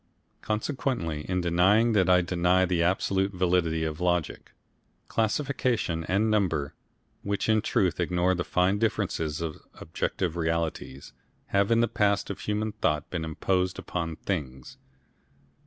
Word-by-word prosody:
Consequently 110 Hz, -, -2 dB
in 90 Hz, 0 st, 0 dB
denying 95 Hz, +7 st, +3 dB
that 95 Hz, -5 st, +3 dB
I 90 Hz, -1 st, +6 dB
deny 90 Hz, +1 st, +2 dB
the 90 Hz, -2 st, 0 dB
absolute 95 Hz, +2 st, +1 dB
validity 90 Hz, -3 st, +1 dB
of 80 Hz, +1 st, -3 dB
logic. 90 Hz, -2 st, -1 dB, 0.6 s
Classification 115 Hz, -, 0 dB
and 105 Hz, +5 st, +1 dB
number, 85 Hz, -9 st, 0 dB, 0.5 s
which 100 Hz, -1 st, -2 dB
in 110 Hz, -1 st, +3 dB
truth 90 Hz, -5 st, 0 dB
ignore 90 Hz, +1 st, +1 dB
the 85 Hz, -1 st, -1 dB
fine 90 Hz, +4 st, +1 dB
differences 85 Hz, -8 st, -1 dB
of 80 Hz, -2 st, -5 dB
objective 90 Hz, -3 st, -3 dB
realities, 80 Hz, -4 st, -3 dB, 0.4 s
have 100 Hz, 0 st, +2 dB
in 115 Hz, 0 st, +4 dB
the 115 Hz, -, +3 dB
past 100 Hz, -3 st, +1 dB
of 100 Hz, -, -7 dB
human 105 Hz, +2 st, -2 dB
thought 75 Hz, -8 st, -1 dB
been 85 Hz, -3 st, -2 dB
imposed 90 Hz, +3 st, -1 dB
upon 85 Hz, -2 st, -4 dB
things. 65 Hz, -5 st, -5 dB
90 Hz, 135 wpm, -27 LUFS, 85-105 Hz, 0.6 s, I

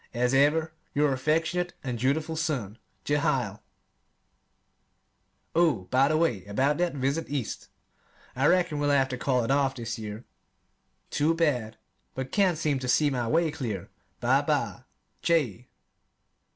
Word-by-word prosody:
As 125 Hz, +2 st, +1 dB
ever, 155 Hz, +4 st, +3 dB, 0.2 s
your 145 Hz, -1 st, +3 dB
affectionate 160 Hz, +6 st, 0 dB
and 125 Hz, -3 st, -3 dB
dutiful 155 Hz, +6 st, 0 dB
son, 130 Hz, -10 st, -2 dB, 0.3 s
JEHIEL 135 Hz, -8 st, 0 dB, 1.9 s
Oh, 160 Hz, -, +3 dB
by 130 Hz, +2 st, +4 dB
the 155 Hz, +1 st, +2 dB
way 140 Hz, -, +1 dB
about 135 Hz, +10 st, +1 dB
that 175 Hz, -3 st, 0 dB
visit 140 Hz, +4 st, -1 dB
East. 140 Hz, -6 st, -4 dB, 0.7 s
I 135 Hz, +3 st, +2 dB
reckon 175 Hz, -3 st, +2 dB
we'll 145 Hz, 0 st, +1 dB
have 135 Hz, -2 st, +3 dB
to 130 Hz, -, -3 dB
call 130 Hz, -3 st, +1 dB
it 115 Hz, -, -1 dB
off 135 Hz, -1 st, +2 dB
this 115 Hz, -2 st, -5 dB
year. 110 Hz, +2 st, -7 dB, 0.9 s
Too 155 Hz, +3 st, +2 dB
bad; 125 Hz, -10 st, 0 dB, 0.4 s
but 130 Hz, 0 st, -4 dB
can't 190 Hz, -5 st, +2 dB
seem 150 Hz, -4 st, 0 dB
to 130 Hz, -, -5 dB
see 145 Hz, +4 st, +3 dB
my 125 Hz, -3 st, -1 dB
way 160 Hz, +3 st, +2 dB
clear. 110 Hz, -10 st, -5 dB, 0.3 s
Bye -, -, +3 dB
bye, -, -, -1 dB, 0.4 s
J. 125 Hz, -, +1 dB
140 Hz, 140 wpm, -27 LUFS, 125-155 Hz, 1.9 s, by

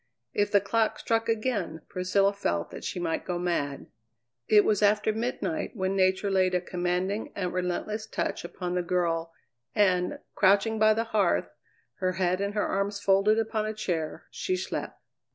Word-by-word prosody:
If 205 Hz, 0 st, +1 dB
the 205 Hz, -, +6 dB
clock 220 Hz, +3 st, 0 dB
struck 225 Hz, 0 st, 0 dB
again 215 Hz, -8 st, -1 dB
Priscilla 195 Hz, +2 st, +1 dB
felt 85 Hz, -, -2 dB
that -, -, -8 dB
she 180 Hz, -, -3 dB
might 165 Hz, -2 st, -1 dB
go 180 Hz, -, -2 dB
mad. 170 Hz, -6 st, -2 dB, 0.6 s
It 210 Hz, -1 st, +6 dB
was 210 Hz, -1 st, +2 dB
after 210 Hz, +1 st, +3 dB
midnight 245 Hz, +7 st, -2 dB
when 190 Hz, -1 st, -1 dB
Nature 190 Hz, +1 st, +2 dB
laid 185 Hz, -1 st, +3 dB
a -, -, +3 dB
commanding 180 Hz, +3 st, -2 dB
and 180 Hz, -3 st, -2 dB
relentless 185 Hz, +4 st, -2 dB
touch -, -, -2 dB
upon 180 Hz, +1 st, -4 dB
the 180 Hz, -, +1 dB
girl, 170 Hz, -2 st, 0 dB, 0.4 s
and, 185 Hz, -4 st, +2 dB, 0.2 s
crouching 200 Hz, +3 st, +3 dB
by 215 Hz, 0 st, +5 dB
the 225 Hz, -, +1 dB
hearth, 215 Hz, -5 st, +1 dB, 0.5 s
her 185 Hz, -2 st, 0 dB
head 185 Hz, +1 st, 0 dB
in 200 Hz, 0 st, -1 dB
her 210 Hz, -, 0 dB
arms 200 Hz, +1 st, -1 dB
folded 200 Hz, +3 st, +3 dB
upon 220 Hz, -1 st, 0 dB
a 215 Hz, -, -4 dB
chair, 165 Hz, -7 st, -3 dB
she 370 Hz, -1 st, -1 dB
slept. -, -, -4 dB
195 Hz, 170 wpm, -28 LUFS, 180-215 Hz, 0.6 s, the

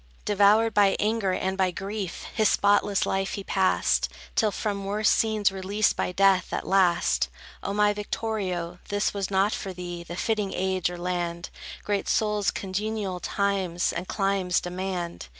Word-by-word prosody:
Devoured 210 Hz, +2 st, +4 dB
by 200 Hz, -1 st, +4 dB
anger 215 Hz, -2 st, +1 dB
and 190 Hz, +1 st, -1 dB
by 190 Hz, -1 st, +2 dB
grief, 195 Hz, +1 st, -5 dB
His 215 Hz, -1 st, +3 dB
spotless 200 Hz, 0 st, +3 dB
life 195 Hz, 0 st, -1 dB
he 200 Hz, -, -5 dB
passed, 190 Hz, -1 st, +1 dB, 0.3 s
Till 215 Hz, -, +3 dB
from 200 Hz, -1 st, -3 dB
worse 205 Hz, +2 st, 0 dB
scenes 215 Hz, -3 st, +2 dB
released 195 Hz, +2 st, 0 dB
by -, -, -1 dB
death, 195 Hz, 0 st, +3 dB
at -, -, -3 dB
last. 180 Hz, -3 st, +3 dB, 0.3 s
O -, -, -3 dB
my 205 Hz, 0 st, +3 dB
Victorio, 195 Hz, -5 st, -3 dB
this 205 Hz, 0 st, 0 dB
was 200 Hz, -2 st, -2 dB
not 195 Hz, +2 st, +2 dB
for 190 Hz, -2 st, -4 dB
thee 175 Hz, -1 st, -6 dB
The 170 Hz, 0 st, -7 dB
fitting 210 Hz, 0 st, -1 dB
age, 185 Hz, -1 st, 0 dB
or 175 Hz, -, -6 dB
land. 175 Hz, -1 st, -3 dB, 0.3 s
Great 205 Hz, -1 st, -1 dB
souls 210 Hz, -2 st, +1 dB
congenial 200 Hz, -1 st, -3 dB
times 190 Hz, -2 st, 0 dB
and 180 Hz, -, -4 dB
climes 195 Hz, -3 st, +1 dB
demand. 180 Hz, -, -4 dB
195 Hz, 155 wpm, -26 LUFS, 185-205 Hz, 0.3 s, Devoured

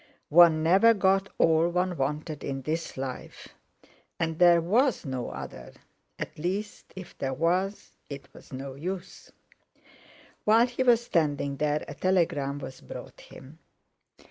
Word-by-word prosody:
One 160 Hz, -1 st, +6 dB
never 195 Hz, +8 st, +5 dB
got 195 Hz, 0 st, +2 dB
all 165 Hz, +1 st, +3 dB
one 180 Hz, +1 st, -1 dB
wanted 150 Hz, +1 st, -3 dB
in 135 Hz, -1 st, -4 dB
this 160 Hz, +2 st, -3 dB
life! 130 Hz, -1 st, -7 dB, 0.7 s
And 160 Hz, -1 st, -2 dB
there 175 Hz, -1 st, +6 dB
was 220 Hz, -, +1 dB
no 130 Hz, -3 st, -4 dB
other—at 65 Hz, -, -10 dB
least, 195 Hz, +6 st, -4 dB
if 185 Hz, -1 st, -10 dB
there 135 Hz, -1 st, -2 dB
was, 180 Hz, +6 st, -1 dB, 0.2 s
it 140 Hz, -1 st, -8 dB
was -, -, -16 dB
no 135 Hz, +1 st, -6 dB
use! 175 Hz, +6 st, -7 dB, 1.1 s
While 225 Hz, +3 st, +5 dB
he 250 Hz, +1 st, -4 dB
was 240 Hz, -2 st, +4 dB
standing 145 Hz, -8 st, 0 dB
there, 150 Hz, +1 st, -1 dB
a -, -, -7 dB
telegram 150 Hz, -6 st, 0 dB
was 135 Hz, -2 st, -9 dB
brought -, -, -10 dB
him. 145 Hz, +5 st, -14 dB
165 Hz, 135 wpm, -27 LUFS, 140-190 Hz, 1.1 s, One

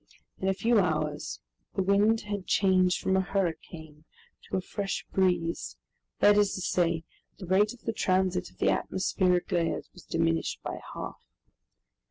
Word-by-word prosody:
In 190 Hz, -, -2 dB
a 195 Hz, -, +3 dB
few 230 Hz, +2 st, +3 dB
hours 155 Hz, -4 st, -1 dB, 0.3 s
the 190 Hz, -, +1 dB
wind 205 Hz, +4 st, +3 dB
had 205 Hz, -2 st, -5 dB
changed 185 Hz, -2 st, +3 dB
from 190 Hz, -, +1 dB
a 190 Hz, -, +4 dB
hurricane 165 Hz, -5 st, -4 dB, 0.5 s
to -, -, 0 dB
a -, -, +1 dB
fresh 195 Hz, +2 st, -4 dB
breeze, 180 Hz, -3 st, 0 dB, 0.4 s
that 205 Hz, 0 st, +6 dB
is 205 Hz, -1 st, +2 dB
to 185 Hz, -, -4 dB
say, 170 Hz, -2 st, +1 dB, 0.3 s
the 195 Hz, -, -8 dB
rate 195 Hz, +4 st, +3 dB
of 245 Hz, -, -23 dB
the 225 Hz, -, -2 dB
transit 185 Hz, -2 st, +1 dB
of -, -, -25 dB
the -, -, +3 dB
atmospheric 185 Hz, -1 st, 0 dB
layers 170 Hz, -2 st, -1 dB
was 180 Hz, -, -13 dB
diminished 165 Hz, 0 st, 0 dB
by -, -, -4 dB, 0.2 s
half. -, -, -7 dB
185 Hz, 160 wpm, -28 LUFS, 170-200 Hz, 0.5 s, that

